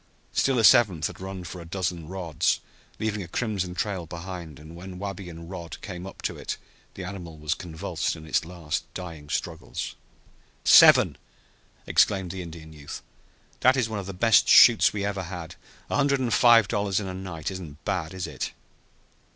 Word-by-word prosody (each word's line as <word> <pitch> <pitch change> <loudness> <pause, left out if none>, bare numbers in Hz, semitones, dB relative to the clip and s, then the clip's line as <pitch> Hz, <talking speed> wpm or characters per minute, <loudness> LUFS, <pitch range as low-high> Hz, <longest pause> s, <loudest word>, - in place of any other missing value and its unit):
Still 135 -2 +2
a 115 - +2
seventh 95 -6 +6
had - - -5
run 95 -1 -6
for 90 +1 -8
a 85 - -11
dozen 85 -3 -3
rods, 85 -5 0 0.4
leaving 105 -1 -2
a 90 - -7
crimson 95 -3 -2
trail 95 -3 -2
behind, 85 -3 -7
and 80 +2 -12
when 90 +1 -9
Wabi 100 -1 -6
and 85 0 -10
Rod 85 -3 -7
came 90 -2 -7
up - - -11
to - - -2
it - - -4 0.4
the 95 - -6
animal 90 -4 -7
was 75 0 -1
convulsed 80 -3 -3
in 80 - -11
its 80 - +1
last 85 -2 -5
dying 80 -5 -8
struggles. - - -4 0.7
"Seven!" - - +7 0.7
exclaimed 95 -4 +2
the 95 - -5
Indian 80 -2 -10
youth. 75 -2 -9 0.6
"That 130 +2 +5
is 125 -3 +1
one 110 -2 -3
of 95 - -7
the - - -4
best 105 +4 +4
shoots 120 -3 +8
we 100 -1 -3
ever 100 -1 -2
had. 85 -2 -7 0.4
A - - +1
hundred 140 -1 +2
and 125 -3 0
five 115 -4 +6
dollars 100 -3 0
in 105 - -4
a 95 - -5
night 90 -4 -5
isn't 80 -5 -9
bad, 85 -1 -2
is 95 - -3
it?" 75 -4 -5
90 Hz, 185 wpm, -26 LUFS, 85-100 Hz, 0.7 s, shoots